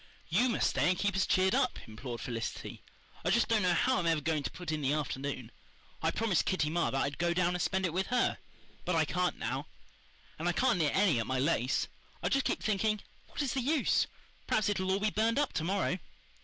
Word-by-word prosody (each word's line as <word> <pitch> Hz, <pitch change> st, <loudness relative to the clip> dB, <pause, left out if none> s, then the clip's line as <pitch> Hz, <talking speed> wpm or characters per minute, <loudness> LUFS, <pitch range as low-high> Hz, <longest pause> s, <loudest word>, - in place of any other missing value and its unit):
"YOU 225 Hz, +10 st, +3 dB
must 230 Hz, -, +1 dB
stay -, -, +2 dB
and 180 Hz, -, +2 dB
keep 200 Hz, 0 st, 0 dB
us 190 Hz, -, +2 dB
cheered 190 Hz, 0 st, +3 dB
up," -, -, +2 dB
implored 115 Hz, +2 st, -7 dB
Felicity. 115 Hz, -1 st, -5 dB, 0.4 s
"I -, -, +1 dB
just 235 Hz, -, +3 dB
don't 225 Hz, -2 st, +2 dB
know 180 Hz, -2 st, +3 dB
how 255 Hz, +9 st, +2 dB
I'm 170 Hz, -, -1 dB
ever 165 Hz, -2 st, +3 dB
going 155 Hz, 0 st, 0 dB
to -, -, -3 dB
put 175 Hz, -3 st, -6 dB
in 155 Hz, -1 st, -2 dB
the 140 Hz, +1 st, +1 dB
afternoon. 135 Hz, -4 st, -3 dB, 0.5 s
I -, -, +2 dB
promised 220 Hz, -6 st, +1 dB
Kitty 155 Hz, -5 st, +1 dB
Marr 170 Hz, +1 st, +1 dB
that 135 Hz, -, 0 dB
I'd 140 Hz, +1 st, -3 dB
go 170 Hz, 0 st, +1 dB
down 180 Hz, 0 st, +2 dB
and 180 Hz, -, -2 dB
spend 190 Hz, 0 st, +1 dB
it 170 Hz, -, -1 dB
with 190 Hz, +2 st, 0 dB
her, 250 Hz, 0 st, +1 dB, 0.4 s
but 180 Hz, -, 0 dB
I 160 Hz, -1 st, +3 dB
can't 180 Hz, +3 st, 0 dB
now. 130 Hz, +6 st, -3 dB, 0.7 s
And 170 Hz, +2 st, 0 dB
I -, -, +1 dB
can't 245 Hz, -3 st, +2 dB
knit 150 Hz, -3 st, +1 dB
any 190 Hz, -, +4 dB
at 115 Hz, -, -2 dB
my 130 Hz, -, 0 dB
lace. 130 Hz, -2 st, +1 dB, 0.4 s
I'd -, -, 0 dB
just 275 Hz, -1 st, +2 dB
keep -, -, -1 dB
thinking, 215 Hz, 0 st, +1 dB, 0.3 s
'What -, -, -3 dB
is 265 Hz, -, -1 dB
the 265 Hz, -, 0 dB
use? 290 Hz, +3 st, +2 dB, 0.4 s
Perhaps 215 Hz, -1 st, +2 dB
it'll 190 Hz, -2 st, 0 dB
all 195 Hz, -, +2 dB
be 215 Hz, +1 st, +1 dB
burned 225 Hz, +3 st, +1 dB
up 290 Hz, -1 st, +1 dB
to 160 Hz, -, -1 dB
morrow. 190 Hz, +1 st, 0 dB
180 Hz, 235 wpm, -32 LUFS, 150-205 Hz, 0.7 s, any